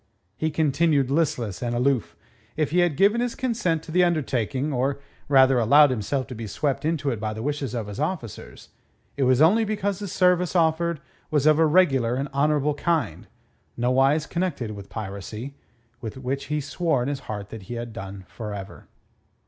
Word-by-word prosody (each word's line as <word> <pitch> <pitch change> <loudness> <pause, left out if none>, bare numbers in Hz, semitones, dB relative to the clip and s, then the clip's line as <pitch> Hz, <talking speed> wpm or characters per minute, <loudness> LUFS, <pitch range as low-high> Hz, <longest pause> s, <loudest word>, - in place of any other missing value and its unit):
He 155 - -1
continued 150 -2 +2
listless 140 - 0
and 120 -1 -2
aloof. 125 -1 0 0.4
If 155 -2 0
he 180 - +3
had 175 -5 +2
given 205 +5 +4
his 245 -1 -2
consent 220 -11 -1
to - - -9
the 180 +2 +4
undertaking, 140 -4 0
or, 135 +2 0 0.3
rather, 130 -2 +5
allowed 140 +5 +6
himself 130 +3 -1
to 130 - -8
be 115 -2 -6
swept 140 +7 -2
into 155 -3 0
it 115 - -3
by 110 0 -3
the 110 - -5
wishes 145 -3 -2
of 115 -3 -2
his 100 +2 -7
officers 150 - -5 0.5
it 140 - +1
was 130 +3 +4
only 210 +8 +5
because 205 -3 -2
the 205 - -5
service 180 -1 +2
offered 165 -1 +1 0.3
was 150 -2 +1
of 155 0 +5
a 160 - +5
regular 135 -8 +3
and 135 +2 -2
honourable 150 +1 +1
kind, 145 - -1 0.5
nowise 135 +5 +2
connected 170 -11 -2
with 100 -2 -9
piracy, 105 +5 -6 0.5
with 110 +1 -6
which 130 +1 -3
he 150 0 -2
swore 145 -2 0
in - - -3
his 140 -1 -2
heart 105 -1 -5
that 110 - -8
he 120 - -4
had 120 -1 -6
done 95 -3 -8
for 105 -3 -6
ever. 95 -1 -9
140 Hz, 185 wpm, -24 LUFS, 120-160 Hz, 0.5 s, allowed